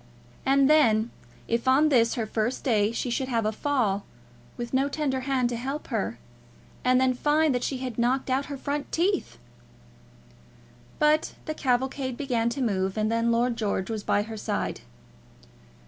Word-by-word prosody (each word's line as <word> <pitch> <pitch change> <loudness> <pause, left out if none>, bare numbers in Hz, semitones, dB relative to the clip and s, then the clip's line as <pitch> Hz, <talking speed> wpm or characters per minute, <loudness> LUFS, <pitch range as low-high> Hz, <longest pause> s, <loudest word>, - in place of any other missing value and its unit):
And 275 0 +5
then, 235 -7 +4 0.4
if 235 +2 -1
on 280 +4 +5
this 235 -5 +3
her 230 - -1
first 220 +3 -2
day 215 -4 +2
she 240 +1 -3
should 260 +2 -1
have 230 -4 0
a 215 - +1
fall, 220 -6 0 0.5
with 240 +1 -5
no 270 +2 +2
tender 280 -3 -1
hand 260 -1 0
to 240 - -2
help 270 +5 -5
her, 210 - -2 0.7
and 255 0 +4
then 260 0 +3
find 295 +3 +2
that 245 - -1
she 270 - -1
had 250 -3 -5
knocked 255 +3 +1
out 265 +1 0
her 280 -1 -5
front 285 +2 -3
teeth! 375 +3 0 1.6
But 300 +1 +2
the 310 - -2
cavalcade 260 -1 -1
began 240 -5 0
to 255 +3 -2
move, 195 -3 -1
and 215 +1 +1
then 230 0 +1
Lord 235 +1 +1
George 200 -3 -2
was 220 -2 -3
by 205 0 +1
her 220 0 -7
side. - - -3
250 Hz, 170 wpm, -26 LUFS, 230-275 Hz, 1.6 s, And